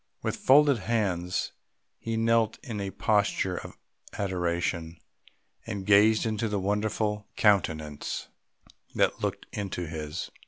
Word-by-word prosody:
With - - -1
folded 140 -2 +5
hands 95 -4 -1 0.5
he 115 0 -3
knelt 115 -1 +2
in 110 -7 -5
a 100 - -3
posture 100 -3 +1
of - - -8 0.4
adoration, 85 -3 -2 0.7
and 100 -4 -4
gazed 105 +2 +5
into 110 0 -1
the 105 - -1
wonderful 105 +1 -1
countenance 80 -8 +1 0.7
that - - +2
looked - - -2
into 95 -3 -4
his. 75 -2 -5
100 Hz, 115 wpm, -28 LUFS, 90-110 Hz, 0.7 s, folded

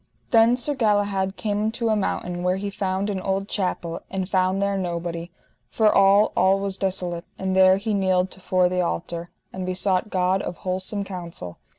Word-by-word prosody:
Then 230 +1 +6
Sir 290 +4 0
Galahad 205 -5 +1
came 205 -1 -1
unto 230 +1 -1
a 215 - +3
mountain 180 -3 -2
where 180 +1 +1
he 200 +1 -4
found 190 0 -2
an 195 - -2
old 195 +1 -1
chapel, 180 -4 -2
and 190 -1 -3
found 185 0 +1
there 200 0 0
nobody, 170 -2 -3 0.4
for 215 -2 +3
all, 200 +2 +5
all 190 +2 +4
was 195 -1 -2
desolate; 180 -3 -2
and 190 0 -2
there 190 0 +6
he 215 +2 -2
kneeled 185 -2 +1
to - - -8
fore 185 -1 +2
the 180 0 0
altar, 170 0 -3 0.2
and 185 - -5
besought 185 +2 0
God 185 0 +1
of 175 - -5
wholesome 190 +2 -1
counsel. 170 - -7
190 Hz, 185 wpm, -24 LUFS, 180-200 Hz, 0.4 s, Then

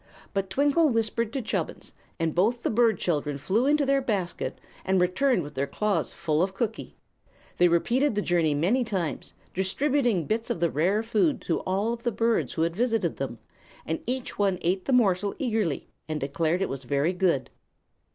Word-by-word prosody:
But 195 -2 -1
Twinkle 290 +3 +3
whispered 230 -1 0
to 270 - -2
Chubbins, 220 - -3 0.3
and 165 -1 0
both 230 +7 +1
the - - 0
bird 225 -2 +3
children 150 -5 -1
flew 205 - +1
into 295 0 +3
their 275 0 +2
basket 200 -8 -2 0.2
and 190 0 +2
returned 185 +4 +2
with 145 0 -9
their 140 0 -1
claws 210 +7 0
full 155 -2 0
of 190 +1 0
cookie. 225 0 -3 0.6
They 175 - +5
repeated 235 +10 +2
the 205 - 0
journey 165 -4 +2
many 200 - +2
times, 190 -9 -3 0.2
distributing 235 - +1
bits 225 +5 -1
of - - -1
the 170 -2 +1
rare 190 +9 +1
food 230 +7 +1
to 165 - -1
all 200 +5 0
of 235 - -7
the 240 - 0
birds 230 +2 0
who 160 - 0
had 165 0 -1
visited 225 -6 0
them, 135 -3 -4 0.5
and 160 - -2
each 255 -2 -3
one 195 -2 +2
ate 185 +2 0
the - - -1
morsel 200 -5 +2
eagerly 220 - -1 0.2
and 155 -1 -2
declared 160 +6 0
that - - +3
it - - -2
was 135 0 -5
very 140 +7 +1
good. 175 -8 +1
195 Hz, 190 wpm, -27 LUFS, 170-235 Hz, 0.6 s, They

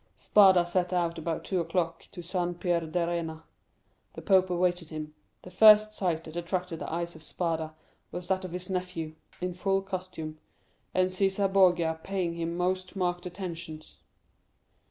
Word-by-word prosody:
"Spada 190 -4 +6
set 180 +1 0
out 170 -2 0
about 160 0 -3
two 185 - -1
o'clock 165 0 -2
to 175 - -8
San 175 0 -2
Pierdarena. 170 -2 -1 0.7
The - - -9
pope 185 -2 +4
awaited 175 -2 0
him. 155 -1 -6 0.3
The 180 - -11
first 215 +2 +7
sight 175 -6 -1
that 160 0 -9
attracted 175 -1 -3
the - - -5
eyes 170 +1 -2
of 160 - -12
Spada 160 -1 -2 0.4
was 175 0 -6
that 190 0 0
of 185 - -5
his 180 +1 -4
nephew, 180 -4 -3 0.3
in 180 0 -2
full 195 +2 0
costume, 185 -5 -6 0.5
and 185 0 +2
Cæsar 195 +1 +1
Borgia 175 -4 +4
paying 185 -3 -1
him 170 0 -3
most 185 +1 -1
marked 175 -1 -1
attentions. 170 -4 -7
175 Hz, 155 wpm, -29 LUFS, 165-185 Hz, 0.7 s, first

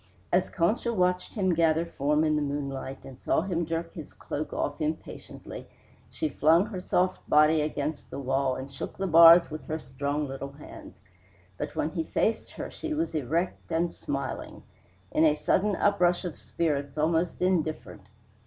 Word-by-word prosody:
As 180 +1 +3
Concha 210 +7 0
watched 180 -3 0
him 190 -4 +2
gather 165 0 +2
form 150 -1 0
in 155 -1 +2
the 150 - +1
moonlight 140 -2 -4
and 130 -1 -11
saw - - +1
him 170 -2 -2
jerk 165 0 -3
his 155 -4 -9
cloak 155 +1 -5
off 145 +1 -3
impatiently, 155 +1 -6 0.4
she 155 - -2
flung 160 +5 +4
her 210 -4 -6
soft 185 +1 0
body 155 +1 +5
against 150 0 -3
the - - -7
wall 135 -1 0
and 135 +1 -7
shook 135 - -7
the 195 - -2
bars 170 -1 +8
with 155 - -7
her 155 - -2
strong 140 +1 -3
little 135 +1 -6
hands. 140 -8 -12 0.5
But - - -5
when 155 - -1
he 165 -2 -2
faced 220 +7 -1
her - - -6
she 320 -1 -4
was 325 +2 -1
erect 160 +6 -2
and 170 +1 0
smiling; - - -5 0.5
in 155 - +2
a 155 -2 +5
sudden 200 +6 +1
uprush 180 -2 +2
of 175 - -4
spirits, 145 -3 -2
almost 165 +2 +1
indifferent. 155 - -1
160 Hz, 170 wpm, -28 LUFS, 145-175 Hz, 0.5 s, bars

